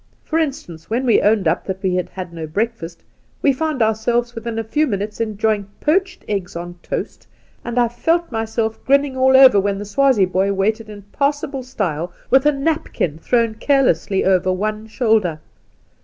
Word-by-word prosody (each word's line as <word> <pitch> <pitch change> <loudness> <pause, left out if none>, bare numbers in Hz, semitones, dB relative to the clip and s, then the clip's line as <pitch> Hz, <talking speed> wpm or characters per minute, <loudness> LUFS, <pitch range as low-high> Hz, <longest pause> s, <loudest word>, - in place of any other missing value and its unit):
For 320 - -1
instance, 180 - -4
when 240 +4 -1
we 235 - +4
owned 205 -3 +2
up - - 0
that 190 0 -5
we 185 -1 +1
had 180 0 -1
had 180 -2 -7
no 160 -1 -6
breakfast^ 180 -2 -3 0.5
we 280 - +4
found 295 -3 -1
ourselves 235 +2 0
within 230 -1 -5
a 225 - -1
few 300 +8 0
minutes 210 0 -3
enjoying 215 -2 -1
poached 375 +5 0
eggs 195 -5 -3
on 175 +1 -7
toast, - - -5 0.4
and 240 0 -5
I 240 -1 +4
felt 330 +8 0
myself 225 0 -2
grinning 280 0 +2
all 260 0 +5
over 260 -6 +8
when 200 0 0
the 205 - -6
Swazie 255 -1 +3
boy 190 +2 0
waited 215 +3 -1
in 205 -1 -10
passable 280 -1 -1
style 180 - -3 0.2
with 265 +2 +5
a - - +6
napkin 275 - -2
thrown 230 +4 +1
carelessly 220 - +1
over 185 -1 +3
one 215 +3 -3
shoulder. 220 -8 +1
220 Hz, 175 wpm, -19 LUFS, 195-260 Hz, 0.5 s, over